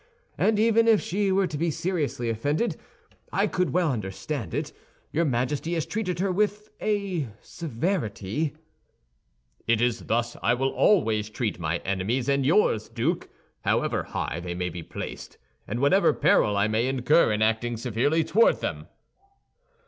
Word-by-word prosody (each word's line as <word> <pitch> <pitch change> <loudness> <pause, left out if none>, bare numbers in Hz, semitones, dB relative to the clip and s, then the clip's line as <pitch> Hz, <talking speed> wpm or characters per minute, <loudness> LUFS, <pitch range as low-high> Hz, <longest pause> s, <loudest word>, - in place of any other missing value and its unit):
And 215 -1 +2
even 225 +1 +4
if 220 -3 +6
she 195 +2 0
were 195 0 +3
to 155 -5 -4
be 170 +1 +1
seriously 155 -7 -2
offended, 145 - 0 0.6
I - - +2
could 180 -3 0
well 165 +2 +2
understand 110 - -4
it; - - -3 0.4
your 170 +2 +1
Majesty 140 +5 -1
has 160 - -1
treated 195 -5 -2
her 190 +2 0
with 210 +2 -1
a 200 -8 -1
severity—" 145 - -3 1.1
"It 115 -1 +3
is 120 -1 0
thus 120 +1 0
I 120 - +3
will 135 +2 0
always 110 - +2
treat 110 -4 -3
my 85 0 -1
enemies 100 +7 -1
and 140 -1 +2
yours, 145 - +3
Duke, - - -1 0.3
however - - +1
high - - -4
they 85 0 -5
may 90 0 -2
be 85 0 -7
placed, - - -8 0.3
and 115 +4 -3
whatever 145 +9 +4
peril 105 -1 +3
I 100 +1 +3
may 110 +3 +1
incur 135 +2 +3
in 105 0 +1
acting 115 +2 0
severely 125 +8 +1
toward 225 +8 +3
them." - - -4
135 Hz, 155 wpm, -26 LUFS, 110-180 Hz, 1.1 s, if